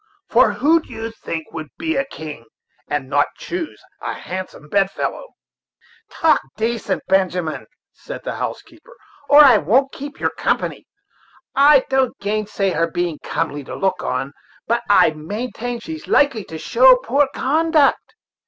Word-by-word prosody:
for - - +4
who 325 +3 +3
do - - -17
you 225 0 -5
think 165 -7 -6
would 155 -1 -6
be 320 0 -2
a 275 - +1
king, 155 - -9 0.4
and 145 -3 -2
not 145 +1 +2
choose 345 -3 -6 0.2
a - - -4
handsome 185 -5 -7
bedfellow?" 195 - -1 0.8
"Talk 325 -1 +2 0.2
decent, 225 +1 -2
Benjamin," 180 -6 0 0.3
said - - -9
the - - -4
housekeeper, - - -7 0.3
"Or 290 +1 +9
I 255 -6 +7
won't 250 - +2
keep 285 +1 -9
your - - 0
company. - - -2 0.7
I 280 -1 +6
don't 265 -2 +1
gainsay 205 -1 -1
her 165 -1 0
being 175 -2 -2
comely 145 -3 -3
to - - -8
look 190 -1 -1
on, 140 +1 -3 0.3
but 235 +1 0
I 205 - +6
will 155 - -9
maintain 230 +8 -4
that 230 - -9
she's 320 -1 -7
likely 235 -8 +2
to 160 - -8
show 255 +9 +6
poor 275 +3 +1
conduct. 310 +5 +2
225 Hz, 155 wpm, -20 LUFS, 165-275 Hz, 0.8 s, Or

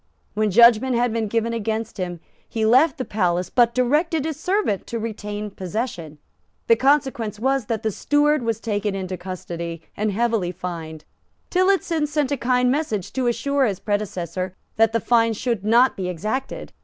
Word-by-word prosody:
When 215 0 +1
judgment 235 +4 +5
had 240 -1 +1
been 225 -1 -1
given 230 +2 -1
against 225 -1 -3
him, 175 -2 -4 0.3
he 220 -1 -1
left 260 +9 +4
the 255 - -3
palace, 180 -3 0
but 235 -2 +3
directed 300 +5 +1
his 315 -2 -4
steward 365 - 0
to 235 - -3
retain 210 -2 -5
possession. 185 - -5 0.5
The 230 - +5
consequence 255 -5 +1
was 265 -1 0
that 225 -1 -2
the 220 - 0
steward 295 +6 +2
was 230 -2 -1
taken 210 -2 -2
into 190 -1 -4
custody 170 -2 -6
and 210 0 -1
heavily 225 -4 0
fined. 165 -3 -7 0.5
Tillotson 365 -4 +2
sent 295 -2 -1
a 285 - +1
kind 250 0 +2
message 255 - -2
to 260 -2 0
assure 270 +3 +1
his 200 -3 -3
predecessor 185 -3 -3 0.2
that 225 0 +4
the 230 - +1
fine 230 -1 +3
should 225 -2 -2
not 235 +5 +4
be 185 -2 -3
exacted. 215 +10 -4
225 Hz, 170 wpm, -22 LUFS, 195-255 Hz, 0.5 s, judgment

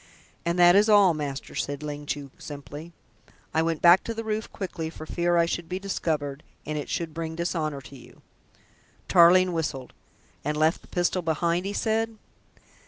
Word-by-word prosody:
And 170 +1 +1
that 175 0 +7
is 210 +2 +5
all, 200 -4 +6
master," 145 -3 -5
said 145 +1 -3
Ling 145 -1 -6
Chu 140 -2 -4
simply. 145 +3 -9 0.6
"I 160 - +3
went 165 -1 -1
back 175 +2 +7
to 230 - -4
the 225 - -4
roof 220 0 -3
quickly 170 -5 -5
for 155 -1 -9
fear 175 +1 +1
I 170 - +4
should 170 0 -4
be 185 - -2
discovered 155 -7 -2 0.2
and 155 - -3
it 150 - -4
should 165 -2 -3
bring 160 0 -4
dishonour 160 -4 -2
to 140 - -13
you." 125 - -16 0.8
Tarling 180 +1 +6
whistled. 150 -6 -3 0.5
"And 150 +1 -1
left 155 +2 +2
the - - -19
pistol 175 +1 0
behind?" 170 +3 0
he 200 - -3
said. 225 +1 -1
165 Hz, 175 wpm, -26 LUFS, 150-180 Hz, 0.8 s, that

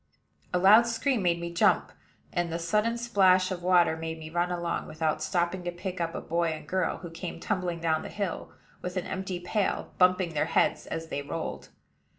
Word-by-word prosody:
A 180 - +2
loud 210 +6 +7
scream 235 +1 0
made 170 -2 +2
me 170 0 -5
jump; 170 - +3 0.4
and 175 -1 0
the 165 - -1
sudden 210 +8 +1
splash 190 -6 +3
of 180 -1 -3
water 175 -2 +4
made 160 0 -5
me 155 0 -9
run 175 +1 +1
along, 175 -1 -2
without 155 0 -1
stopping 175 +1 0
to 175 - -1
pick 180 +1 -5
up 165 0 -2
a - - -3
boy 170 +1 0
and 155 -1 -4
girl 185 -2 0
who 170 -2 -9
came 170 +2 -6
tumbling 180 -5 -2
down 160 -1 +1
the - - -7
hill, 200 -4 -4 0.3
with 180 +1 -4
an 180 - -2
empty 190 -1 -4
pail, 195 +3 -1
bumping 180 -2 +3
their 150 - +1
heads - - +1
as 165 0 -5
they 145 - -2
rolled. 155 +3 -5
175 Hz, 200 wpm, -28 LUFS, 165-190 Hz, 0.4 s, loud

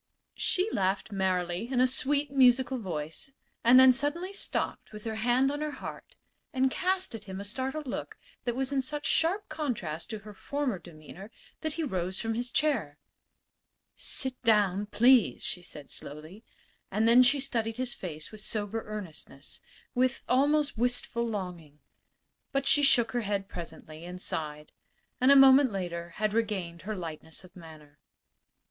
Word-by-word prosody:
She 370 +2 +1
laughed 195 +2 0
merrily 185 +1 -1
in 255 - +1
a 255 - +6
sweet, 280 +2 +1
musical 260 -1 +4
voice, 165 - -4 0.3
and 245 +2 +8
then 260 0 +9
suddenly 295 +9 0
stopped 400 - -3
with 210 -1 -9
her 225 - -3
hand 245 +4 +2
on 290 +1 -4
her 305 - -1
heart - - -9 0.4
and 260 0 +2
cast 375 0 0
at 220 -2 -8
him 190 -1 -6
a - - -5
startled 265 +8 -3
look 255 - -5 0.3
that 240 -1 -1
was 265 +1 -1
in 275 -1 +1
such 295 +2 -5
sharp 370 +6 +1
contrast 225 - -4
to 220 - -4
her 210 0 -11
former 270 -1 -2
demeanor 170 +4 -12 0.3
that 315 -1 -3
he 330 - -2
rose 185 - -2
from 225 0 -1
his 240 +2 -2
chair. 235 - 0 1.0
"Sit 260 -2 0
down, 205 -3 +3
please," 245 +1 +4
she 180 - -3
said, 150 -4 -10
slowly. 155 +9 -10 0.5
And 215 +3 +1
then 240 +2 +8
she 275 +3 +4
studied 230 -4 -2
his 255 -1 -2
face 155 -4 -7
with 215 -1 -9
sober 215 +1 -3
earnestness 170 -9 -7 0.3
with 255 +1 +1
almost 285 0 +2
wistful 240 -1 +1
longing. 180 -8 -5 0.7
But 275 -1 0
she 280 +2 +4
shook 240 -5 +4
her 240 +1 0
head 200 -2 -2
presently, 160 -2 -9
and 180 +1 -7
sighed; 150 -3 -4 0.5
and 255 +2 +5
a - - +8
moment 270 -1 +8
later 170 -3 -4
had 215 -1 0
regained 195 -7 -2
her 215 - -1
lightness 160 -2 -6
of 185 - -16
manner. 155 -4 -14
225 Hz, 165 wpm, -29 LUFS, 180-265 Hz, 1.0 s, then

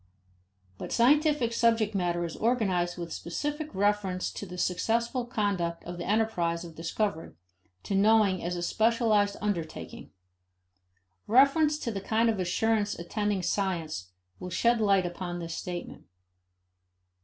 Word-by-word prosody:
But - - -6
scientific 285 -1 +3
subject 230 -2 +2
matter 175 -3 0
is 165 - -6
organized 190 -7 0
with 170 -2 -5
specific 295 - -4
reference 195 -2 0
to 200 - -7
the 180 0 -8
successful 230 +7 0
conduct 195 -7 -1
of 175 0 -7
the 175 - -4
enterprise 180 -6 0
of 165 - -10
discovery, 165 +2 -3 0.5
to - - -4
knowing 200 -2 +4
as 175 +1 -2
a 175 - -3
specialized 215 -1 +2
undertaking. 185 -6 -4 1.2
Reference 280 +6 +4
to 235 - -3
the 195 -2 -4
kind 225 +3 +2
of 215 - -4
assurance 205 +3 0
attending 200 +2 -2
science 165 - -2 0.3
will 180 - -6
shed 235 +5 +2
light 195 -3 +3
upon 175 0 -4
this 170 -1 -5
statement. 175 -1 -6
200 Hz, 130 wpm, -28 LUFS, 175-225 Hz, 1.2 s, knowing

